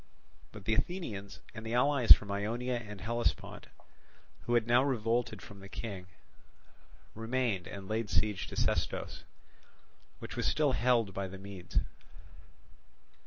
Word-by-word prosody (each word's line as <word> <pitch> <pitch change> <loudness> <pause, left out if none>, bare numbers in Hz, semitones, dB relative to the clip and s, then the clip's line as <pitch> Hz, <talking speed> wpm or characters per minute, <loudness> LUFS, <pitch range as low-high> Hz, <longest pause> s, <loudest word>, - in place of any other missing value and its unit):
But 105 -2 -11
the 110 - +2
Athenians 110 - -2
and 110 -1 -7
the 115 +1 -2
allies 135 -1 +4
from 100 -1 +9
Ionia 115 +5 -1
and 105 -4 -8
Hellespont, 115 +2 -2 0.8
who 120 - +3
had 115 -2 +3
now 120 +2 +5
revolted 115 -4 0
from 100 -1 -11
the 95 0 -11
King, 100 -6 -6 1.1
remained 115 -5 -1
and 95 -1 -8
laid 110 0 -1
siege 105 -3 +1
to - - -8
Sestos, - - -1 0.9
which - - -8
was - - 0
still 150 -3 +3
held 120 -5 +2
by 95 0 -2
the 95 +1 -8
Medes. 95 -2 -3
110 Hz, 135 wpm, -32 LUFS, 100-120 Hz, 1.1 s, from